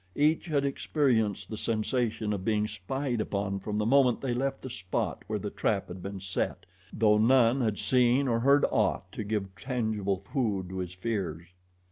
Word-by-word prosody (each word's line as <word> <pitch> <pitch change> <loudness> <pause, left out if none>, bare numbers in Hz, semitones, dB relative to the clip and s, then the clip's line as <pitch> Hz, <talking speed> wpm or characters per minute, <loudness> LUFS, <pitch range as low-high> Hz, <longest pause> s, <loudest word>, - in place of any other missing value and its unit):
Each 155 +4 +2
had 145 -3 +1
experienced 130 - +1
the 110 - -4
sensation 110 -1 -1
of 95 -2 -4
being 105 0 +1
spied 120 +5 -2
upon 100 -1 -2
from 105 +2 -3
the 105 - 0
moment 130 0 +4
they 130 -3 -2
left 135 +2 -2
the 130 - -5
spot 95 -5 -3
where - - -1
the - - -5
trap - - -1
had 90 +1 -7
been 100 +1 -6
set, 95 0 -3 0.3
though 105 -1 +3
none 125 +2 +4
had 110 -4 0
seen 125 +5 +3
or 115 -2 +2
heard 140 +4 +5
aught 95 -4 0
to 110 - -5
give 100 -2 -3
tangible 110 -4 -1
food 100 - -2
to 95 0 -5
his 90 -1 -4
fears. 90 -5 -3
110 Hz, 180 wpm, -29 LUFS, 100-125 Hz, 0.3 s, heard